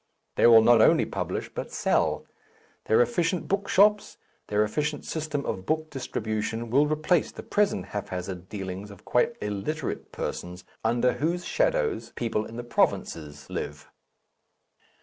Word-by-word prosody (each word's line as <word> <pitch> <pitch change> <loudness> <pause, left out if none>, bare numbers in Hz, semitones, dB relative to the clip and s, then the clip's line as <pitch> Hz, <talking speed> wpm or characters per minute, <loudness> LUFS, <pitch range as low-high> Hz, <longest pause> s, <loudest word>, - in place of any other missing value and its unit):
They - - +5
will 115 -1 +8
not 120 -1 +6
only - - +5
publish, - - -3
but - - -5
sell; - - +1 0.6
their 110 - +4
efficient 165 +8 -1
book 200 +1 -1
shops, 210 +1 +4 0.3
their 105 +1 +2
efficient 150 +6 -2
system 155 -3 -3
of 95 - -4
book 155 0 -1
distribution 115 -3 -3
will 145 +4 +4
replace 155 +2 +1
the - - -9
present 210 -1 +1
haphazard 90 -2 -5
dealings 95 0 -5
of 100 -2 -14
quite - - +2
illiterate 105 +9 -3
persons 90 0 -5 0.2
under 120 +2 +2
whose 170 +4 -1
shadows - - 0
people 110 -2 -1
in 115 - -9
the 120 - -4
provinces 80 -9 -1
live. 75 0 -6
120 Hz, 140 wpm, -27 LUFS, 105-155 Hz, 0.6 s, will